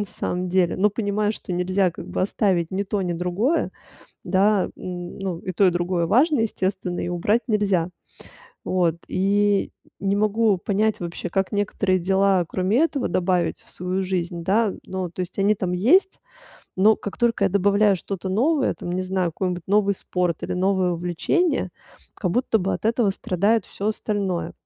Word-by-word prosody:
на 205 - -2
самом 180 0 -3
деле, 180 -1 +2
но 210 +2 +3
понимаю, 210 0 -1
что 185 - -7
нельзя 185 +1 +1
как 170 - -10
бы - - -3
оставить 185 -4 +1
ни 195 +2 -1
то, 200 +1 -2
ни 175 - -1
другое, 180 - 0 0.5
да. 195 +2 +2
Ну, 180 0 -5
и 185 - -5
то, 190 +2 +3
и - - +5
другое 175 0 0
важно, 275 - +3
естественно, 190 -4 -2
и - - -3
убрать 205 +7 +1
нельзя. 200 -6 +1 0.7
Вот 175 -3 +1
и 200 +1 +1 0.3
не 200 +1 0
могу 215 -1 +2
понять 210 +3 0
вообще, 170 0 -5
как 195 +1 0
некоторые 200 -2 +1
дела 190 0 +2
кроме 185 +7 0
этого 290 -5 0
добавить 175 -2 0
в - - -17
свою 180 +2 -2
жизнь, 175 -2 -3
да. 210 +2 +2
Ну, 185 -2 -4
то 180 - -7
есть 180 +2 -5
они 200 +2 +3
там 185 -3 -3
есть, 320 - +3 0.6
но 210 +4 +5
как 205 - -7
только 230 -4 +2
я - - +4
добавляю 200 +1 +3
что-то 190 +1 -5
новое, 265 +9 +1
там, 175 - -7
не 185 +1 -1
знаю, 185 -2 -1
какой-нибудь 180 0 -3
новый 200 0 +3
спорт 180 -3 -2
или - - -3
новое 185 0 +1
увлечение, 180 - 0 0.4
как 180 -5 -2
будто 240 0 +1
бы 195 +1 -1
от - - -7
этого 225 -2 +2
страдает 200 +3 +1
всё 205 +2 -3
остальное. 200 -5 -2
190 Hz, 175 wpm, -23 LUFS, 180-210 Hz, 0.7 s, и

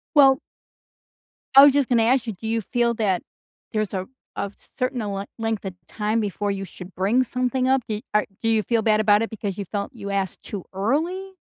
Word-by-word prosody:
Well 270 -2 +7 1.1
I 275 +1 +10
was 285 -1 +8
just 285 -3 +2
gonna 235 -2 +4
ask 250 +2 +3
you, 220 - -2
do 210 +4 -8
you 225 0 0
feel 235 +3 +1
that 200 -5 +1 0.5
there's 215 -2 -1
a 185 -1 -3 0.3
a 200 - -2 0.3
certain 255 -1 -1
le 200 -2 -3
length 225 -2 -1
of 190 -2 -5
time 215 +1 -1
before 205 -1 -1
you 195 0 -3
should 180 +1 -11
bring 210 +8 +2
something 255 +1 0
up, 265 -1 +3
do 215 -1 -3
are 210 0 +3 0.2
do 225 - +1
you 220 -1 +2
feel 230 0 +1
bad 215 -1 +3
about 210 -1 +4
it 225 - -1
because 205 -4 -4
you 205 - -3
felt 200 +2 -4
you 200 - -7
asked 195 -2 -2
too 200 -4 -6
early? 330 - -1
220 Hz, 210 wpm, -23 LUFS, 200-250 Hz, 1.1 s, I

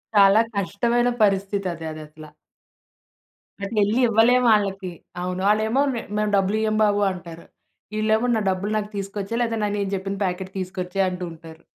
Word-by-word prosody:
చాలా 200 +1 +7
కష్టమైన 235 +6 +1
పరిస్థితి 195 -1 +1
అది 165 -1 -8
అదసల. 155 0 -10 1.4
అటెళ్ళి 210 +2 +1
ఇవ్వలేమాళ్ళకి 220 -4 +3 0.3
అవును. 180 +1 -3
ఆళ్ళేమో 220 +5 +2
"మేం 230 - -5
మేము 210 0 0
డబ్బులియ్యము 215 +2 +1
బాబు" 205 -1 +2
అంటారు. 170 -2 -9 0.5
ఇళ్ళేమో 220 +2 +2
నా 220 - 0
డబ్బులు 190 +2 -2
నాకు 210 -1 -3
తీసుకొచ్చే 200 +2 -4
లేదా 230 -1 0
న - - +2
నేను 200 -1 -1
జెప్పిన 195 +1 -4
ప్యాకెట్ 185 +1 -4
తీసుకొచ్చేయి 185 +1 -2
అంటూ 180 0 -6
ఉంటారు. 165 0 -13
200 Hz, 140 wpm, -23 LUFS, 185-215 Hz, 1.4 s, చాలా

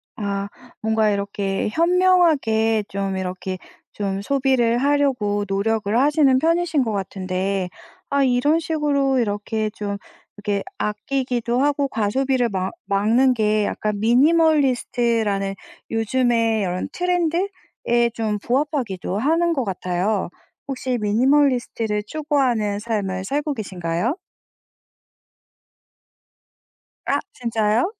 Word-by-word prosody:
아 200 -3 -3 0.3
뭔가 220 -1 +2
이렇게 200 -1 -1
현명하게 320 - +3
좀 195 -1 -3
이렇게 185 0 -4 0.4
좀 195 -1 -3
소비를 255 -1 +2
하려고 250 -7 +1
노력을 205 +2 0
하시는 280 -1 +4
편이신 330 -2 +2
것 225 - -2
같은데 190 -1 -2 0.4
아 280 0 +2
이런 265 +5 +3
식으로 290 -4 +1
이렇게 215 0 -1
좀 200 -1 -4 0.4
이렇게 205 -1 -2
아끼기도 245 - -1
하고 285 -1 +1
과소비를 250 +2 0
막 190 -1 -2
막는 225 +6 +3
게 215 -2 +1
약간 210 -1 -2
미니멀리스트라는 240 -7 +2 0.4
요즘에 225 -1 +1
요런 180 -1 -2
트렌드에 355 0 0 0.7
좀 220 -2 -1
부합하기도 240 - -1
하는 330 +7 +2
것 270 -5 0
같아요. 185 0 -1 0.4
혹시 260 -2 -2
미니멀리스트를 235 -1 +1
추구하는 255 -9 0
삶을 200 -4 -2
살고 290 +6 -1
계신가요? 190 - -2 2.9
아 - - +1
진짜요? 225 -1 +1
230 Hz, 250 characters per minute, -22 LUFS, 205-275 Hz, 2.9 s, 하시는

